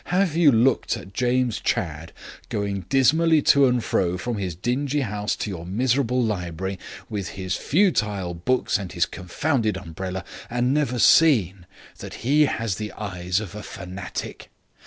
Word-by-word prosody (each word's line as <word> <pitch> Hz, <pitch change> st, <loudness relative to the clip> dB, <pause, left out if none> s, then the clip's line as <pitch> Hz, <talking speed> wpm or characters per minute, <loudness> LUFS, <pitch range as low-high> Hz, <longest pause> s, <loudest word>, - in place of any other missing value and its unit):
Have 180 Hz, -3 st, +1 dB
you 165 Hz, -4 st, +6 dB
looked 120 Hz, 0 st, +2 dB
at 95 Hz, -2 st, -11 dB
James 125 Hz, 0 st, +1 dB
Chadd 80 Hz, 0 st, -2 dB, 0.4 s
going 100 Hz, -3 st, -3 dB
dismally 155 Hz, +5 st, +4 dB
to 140 Hz, -1 st, +5 dB
and 125 Hz, -2 st, +1 dB
fro 90 Hz, -4 st, 0 dB
from 115 Hz, +2 st, -3 dB
his 90 Hz, -4 st, -3 dB
dingy 135 Hz, -, -1 dB
house 105 Hz, -3 st, -2 dB
to 105 Hz, -, -4 dB
your 85 Hz, -3 st, -6 dB
miserable 125 Hz, +6 st, 0 dB
library, 95 Hz, -3 st, -3 dB, 0.3 s
with 100 Hz, -4 st, -4 dB
his 95 Hz, -1 st, -2 dB
futile 105 Hz, -, +1 dB
books 125 Hz, +10 st, 0 dB
and 95 Hz, -3 st, -7 dB
his 85 Hz, -, +2 dB
confounded 110 Hz, -, -1 dB
umbrella, 90 Hz, +3 st, -6 dB, 0.3 s
and 125 Hz, +2 st, +1 dB
never 140 Hz, -4 st, 0 dB
seen 100 Hz, -, +4 dB, 0.3 s
that -, -, -8 dB
he 150 Hz, +4 st, +5 dB
has 115 Hz, -8 st, -2 dB
the 105 Hz, -1 st, -5 dB
eyes 90 Hz, -3 st, -2 dB
of 100 Hz, -4 st, -7 dB
a 105 Hz, -, -7 dB
fanatic? 95 Hz, -3 st, -7 dB
105 Hz, 155 wpm, -24 LUFS, 95-130 Hz, 0.4 s, you